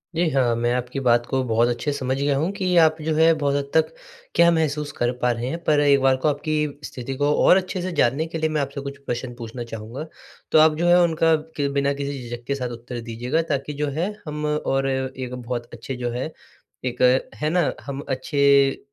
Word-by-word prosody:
जी, 170 -1 +2
हाँ, 125 -4 +2
मैं 120 +1 0
आपकी 125 +2 -3
बात 120 0 +4
को 130 -1 -1
बहुत 115 0 +2
अच्छे 120 +5 -1
से 140 - -3
समझ 130 0 -1
गया 140 0 +1
हूँ 165 +7 0
कि 185 -2 0
आप 160 -1 +6
जो 155 +1 -1
है 165 +1 +5
बहुत 140 -2 0
हद 140 0 -2
तक 160 -1 +4 0.5
क्या 170 0 +6
महसूस 150 -2 0
कर 120 0 +1
पा 125 0 +3
रहे 120 +1 -3
हैं, 165 - -3
पर 150 -1 +3
एक 140 -1 +5
बार 135 -1 +4
को 140 - 0
आपकी 150 0 -1
स्थिति 130 -1 -6
को 145 +1 +2
और 185 - +7
अच्छे 185 -1 -2
से 185 0 -3
जानने 140 +7 +2
के 165 - -5
लिए 160 0 0
मैं 155 -2 0
आपसे 140 0 -4
कुछ 140 0 -7
प्रश्न 120 0 -4
पूछना 120 0 -7
चाहूँगा, 115 +6 -6 0.5
तो 155 - +6
आप 155 0 +5
जो 175 +2 0
है 175 +1 +6
उनका 165 -1 +3 0.2
के 140 -1 +1
बिना 140 0 +1
के 140 0 -5
किसी 140 -1 -4
झिझक 120 0 -6
के 140 - 0
साथ 125 -2 -3
उत्तर 120 0 -7
दीजिएगा 125 +8 -1
ताकि 140 +1 -2
जो 145 +1 -2
है 185 +6 0
हम 150 0 -4
और 135 -3 0
एक 130 -1 -3
बहुत 120 -1 -5
अच्छे 120 +3 -6
जो 120 - 0
है, 130 +6 -3 0.5
एक 125 - -3 0.3
है 150 0 -1
ना? 175 -2 +2
हम 140 0 -6
अच्छे 140 +1 +3
140 Hz, 230 wpm, -23 LUFS, 125-155 Hz, 0.5 s, और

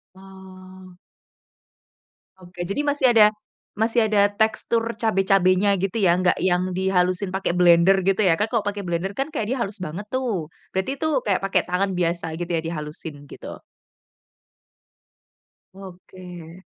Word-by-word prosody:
Oh. 185 -1 -14 1.4
Oke 180 -1 -11
jadi 200 - -1
masih 285 -2 +1
ada 210 -1 +7 0.4
masih 225 +1 +2
ada 205 -1 +3
tekstur 220 +2 0 0.2
cabe-cabenya 195 -2 +3
gitu 195 +4 -2
ya, 175 -2 +4
gak 180 0 +3
yang 180 0 0
dihalusin 185 0 0
pake 190 -2 -1
blender 180 +2 +5
gitu 195 +2 +1
ya, 180 - +5
kan 210 +4 -1
kalo 225 -4 -1
pake 205 0 -3
blender 180 +1 -3
kan 270 +3 -2
kayak 290 -9 -3
dia - - -3
halus 205 -1 -3
banget 170 +7 -6
tuh, 230 -11 -2 0.2
berarti 190 +9 -2
itu 315 - -1 0.2
kayak 200 -3 +1
pake 195 -2 +2
tangan 190 +3 -1
biasa 170 -2 -2
gitu 175 - -4
ya - - -1
di - - -2
halusin 150 -2 -8
gitu. - - -9 2.2
Oke. 180 -2 -12
190 Hz, 145 wpm, -23 LUFS, 180-205 Hz, 2.2 s, ada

